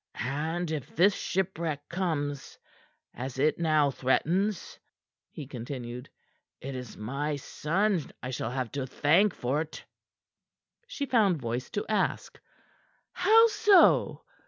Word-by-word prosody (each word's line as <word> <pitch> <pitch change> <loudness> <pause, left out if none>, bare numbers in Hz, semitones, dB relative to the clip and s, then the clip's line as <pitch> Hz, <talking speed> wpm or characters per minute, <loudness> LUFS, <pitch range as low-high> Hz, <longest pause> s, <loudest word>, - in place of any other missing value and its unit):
"And 160 +6 -2
if 150 -5 -5
this 190 +5 +5
shipwreck 170 -7 -2
comes, 155 -6 -3 0.6
as 130 +1 -6
it 150 +5 +2
now 155 -4 +3
threatens," 175 +10 0 0.5
he 150 - -8
continued, 125 -1 -7 0.5
"it 135 +1 -6
is 125 -3 -8
my 140 +7 -3
son 170 +5 -1
I 125 - -4
shall 120 - -3
have 125 -2 -3
to 135 -2 -3
thank 170 +10 +3
for't." 150 +6 -3 1.0
She 300 -13 -4
found 215 - +2
voice 120 0 -4
to 205 - -3
ask: 210 -3 -1 0.7
"How 450 +1 +5
so?" 420 -4 +4
150 Hz, 115 wpm, -28 LUFS, 130-190 Hz, 1.0 s, this